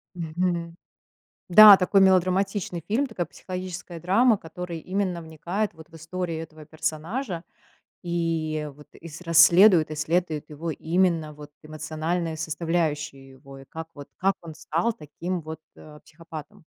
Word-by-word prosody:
Мгм, 170 0 -2 0.7
да. 205 +1 +11
Такой 195 +1 +3
мелодраматичный 185 -1 +2
фильм, 245 +7 +1
такая 185 -7 -3
психологическая 180 -2 -7
драма, 215 +6 +3
который 170 0 -7
именно 185 -1 -2
вникает 175 +6 -3
вот 160 0 -14
в - - -29
историю 165 0 -4
этого 155 -1 -11
персонажа, 165 - -4 0.6
и 165 -3 -2
вот, 150 0 -16
и 165 - -11
с 160 +3 -10
расследует, 170 0 +6
исследует 155 0 -1
его 160 +3 -5
именно 165 -1 0
вот 150 0 -12
эмоциональные 155 +2 -3
составляющие 155 -4 -2
его, 135 +1 -14
и - - -13
как 160 +3 -8
вот, 145 -1 -10
как 195 +1 +1
он 160 -2 -9
стал 165 +8 -1
таким 175 0 -5
вот, 160 +1 -8 0.2
э, 150 -1 -14
психопатом. 165 +3 -11
165 Hz, 135 wpm, -25 LUFS, 155-185 Hz, 0.7 s, да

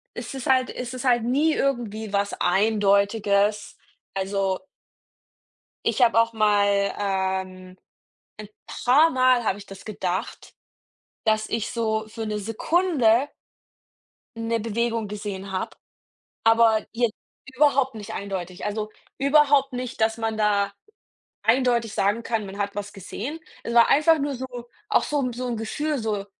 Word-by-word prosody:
es - - -6
ist 265 -2 -6
halt 260 -1 +3
es 250 0 -6
ist 255 +1 -6
halt 240 -2 +3
nie 290 +6 +2
irgendwie 220 -6 -2
was 200 0 0
Eindeutiges. 200 +1 +2 0.4
Also 195 -1 -1 1.3
ich - - 0
habe 230 -1 +5
auch 230 0 +1
mal, 205 -2 +2
ähm 190 -2 -3 0.6
ein 215 -1 -8 0.2
paar 290 +7 +3
Mal 255 -2 +3
habe 200 -2 0
ich 205 - -12
das 195 0 -11
gedacht, 185 -4 -4 0.7
dass 215 0 +1
ich 225 -1 -2
so 220 -2 -1
für 225 0 -6
'ne 210 0 -2
Sekunde 250 - +2 1.1
'ne 230 0 -1
Bewegung 230 0 -1
gesehen 200 -2 -6
habe, 185 - -4 0.7
aber 225 -1 +4
jetzt 230 -1 0 0.3
überhaupt 265 -2 +2
nicht 205 -2 -7
eindeutig. 185 -2 -5
Also, 210 +1 -3 0.3
überhaupt 280 0 +4
nicht, 250 -2 -5
dass 225 0 +2
man 225 -1 -2
da 200 -2 +1 0.7
eindeutig 235 -2 +2
sagen 205 +4 +1
kann, 225 -3 -2
man 195 +1 -9
hat 200 0 -2
was 205 0 -5
gesehen. 230 - -6 0.2
Es 235 - -4
war 235 -1 +6
einfach 310 +3 +5
nur 285 -1 -2
so 260 +1 -5 0.4
auch - - +3
so 295 -1 -1
'n 250 -2 -1
so 255 +1 -4
'n 240 -2 -2
Gefühl, 295 +6 -2
so, 215 -3 -2
220 Hz, 145 wpm, -24 LUFS, 200-250 Hz, 1.3 s, war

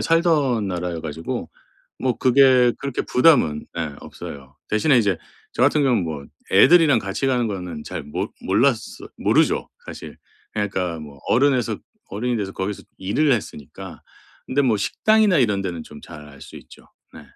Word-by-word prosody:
살던 150 - +2
나라여 90 -2 -3
가지고 80 +1 -5 0.5
뭐 125 -2 0
그게 130 -1 +5
그렇게 140 -2 -3
부담은 125 - +3
네 80 -4 -3
없어요. 70 0 -10
대신에 125 +6 +3
이제 100 -6 +1 0.4
저 - - -5
같은 145 +3 +3
경우는 125 -8 +2
뭐 75 -4 -5 0.3
애들이랑 160 -7 +6
같이 100 +5 -3
가는 125 -3 +1
거는 90 -6 -5
잘 - - -6
못 75 - -5
몰랐어 110 +3 0
모르죠 - - +2 0.2
사실. - - -9 0.4
그러니까 95 -5 -2
뭐 75 -2 -11
어른에서 125 -4 +2 0.3
어른이 120 +4 -2
돼서 95 -2 -3
거기서 95 +1 -4
일을 135 +10 +1
했으니까. 75 - -6 0.4
근데 140 +2 +1
뭐 115 -4 +2
식당이나 215 - +2
이런 105 -6 +2
데는 85 -4 -4
좀 75 - -12
잘 75 -3 -11
알 70 -2 -15
수 - - -11
있죠. - - -15 0.3
네 - - -12
110 Hz, 325 characters per minute, -22 LUFS, 85-130 Hz, 0.5 s, 애들이랑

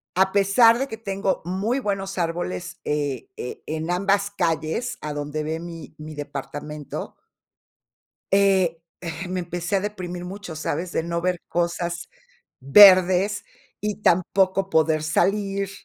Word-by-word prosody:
a 190 +1 +3
pesar 215 +4 +5
de 270 - -1
que 220 - -7
tengo 195 -3 -2
muy 200 +9 -1
buenos 195 -4 -3
árboles, 175 0 -3
eh, 145 -4 -2
e 125 - -7
en 160 +2 -3
ambas 200 +2 +1
calles, 165 +4 -1
a 150 -1 -4
donde 145 +1 -3
ve 160 +1 -3
mi 165 -2 -9
mi 155 0 -9
departamento. 145 +1 -6 1.2
Eh 190 -4 +3 0.5
me 185 0 -2
empecé 175 +2 -4
a - - +1
deprimir 180 -4 -5
mucho, 190 -2 -7
¿sabes?, 165 +3 -3
de - - 0
no 170 0 -2
ver 180 0 -1
cosas 170 0 -2 0.5
verdes, 185 +5 +7 0.4
y 210 0 -2
tampoco 190 +1 +2
poder 160 -1 +2
salir. 195 +4 0
180 Hz, 135 wpm, -24 LUFS, 160-195 Hz, 1.2 s, verdes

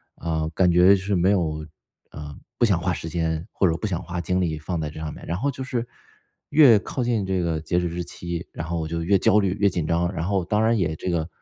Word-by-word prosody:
呃， 80 -1 -2
感 90 -2 +3
觉 90 +2 +6
就 95 - -3
是 100 +1 -1
没 90 +3 +3
有， 80 -5 0 0.5
啊， 75 -1 -8 0.2
不 120 - +4
想 95 -6 +2
花 90 +2 0
时 80 - -5
间 80 0 -2
或 95 - +2
者 80 - +1
不 110 - -3
想 90 -4 -2
花 85 0 -4
精 90 +2 0
力 80 -3 -1
放 85 +3 -3
在 75 -1 -3
这 80 - -10
上 80 -1 -4
面。 - - -11
然 85 - -2
后 140 +7 0
就 130 - -6
是 125 -2 -2 0.6
越 140 -8 +7
靠 125 +5 -4
近 115 -4 0
这 95 -1 0
个 85 -2 -1
截 85 +3 0
止 90 - -1
日 85 +1 -4
期， 85 0 -6
然 80 - -6
后 85 0 -2
我 80 - -3
就 85 +1 -3
越 100 +3 +4
焦 105 +3 +4
虑 95 -1 0
越 100 - +4
紧 85 -4 -2
张， 85 +3 0
然 85 -2 -3
后 95 -3 0
当 105 +4 +1
然 115 +1 +3
也 85 -5 0
这 90 - -4
个 85 -2 -1
85 Hz, 290 characters per minute, -24 LUFS, 80-100 Hz, 0.6 s, 越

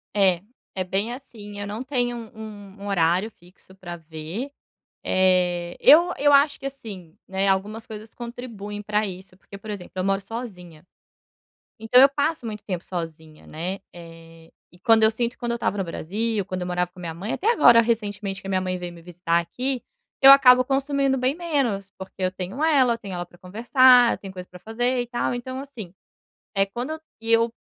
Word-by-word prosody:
É, 190 -3 +3 0.3
é 185 - -1
bem 195 +5 -2
assim. 210 -6 -10
Eu 205 - -4
não 215 +5 -5
tenho 245 -3 -1
um 215 -3 -10
um - - -6
horário 185 +3 +1
fixo 180 +1 -21
para 175 -3 -8
ver. 165 - -7 0.5
Eh, 180 -2 +1
eu 345 +5 +7
eu 290 +1 +4
acho 285 +1 +4
que - - -7
assim, 205 -11 -8
né, 190 +1 0
algumas 210 +4 -1
coisas 215 0 -10
contribuem 230 -4 -7
pra 210 0 0
isso, 185 0 -10
porque, 200 +1 -13
por 215 +1 -9
exemplo, 195 -4 -7
eu 185 - -1
moro 195 0 +1
sozinha. 180 -8 -9 0.9
Então 225 +3 +5
eu 275 - +8
passo 285 -1 -1
muito 210 -2 -6
tempo 180 -4 -4
sozinha, 160 -3 -7
né? 180 +5 -5
Eh, 165 -1 -14 0.2
e 175 - -20
quando 225 +3 +4
eu 220 - +5
sinto 235 +2 -2
quando 240 -1 -3
eu 235 - 0
estava 205 -3 -1
no 195 - 0
Brasil, 200 +5 -2
quando 185 -2 -5
eu 180 - -3
morava 180 0 -1
com 180 - -14
minha 170 -2 -5
mãe 190 +7 -5
até 440 +5 +1
agora, 240 - +7
recentemente, 205 -4 -2
que - - -9
a - - -4
minha 185 -1 +1
mãe 185 0 -2
veio 175 -1 -7
me 170 - -13
visitar 170 0 -1
aqui, 250 +9 -3 0.4
eu 270 0 +11
acabo 255 -2 +8
consumindo 275 0 0
bem 255 +3 0
menos, 270 - -1
porque 190 0 -9
eu 185 - +1
tenho 190 - -5
ela, 275 -7 +4
eu - - -4
tenho 200 -5 -7
ela 175 - -4
pra 175 0 -21
conversar, 245 +6 +5
eu - - -5
tenho 195 - -9
coisa 180 -1 -8
pra 180 - -13
fazer 245 +4 -1
e 245 - -5
tal. 240 0 -1
Então 255 +2 -5
assim, 230 -10 -9 0.6
eh, 195 -1 +3
quando 250 +10 -5 0.2
e 225 0 -2
eu, 230 0 +3
205 Hz, 200 wpm, -24 LUFS, 180-245 Hz, 0.9 s, eu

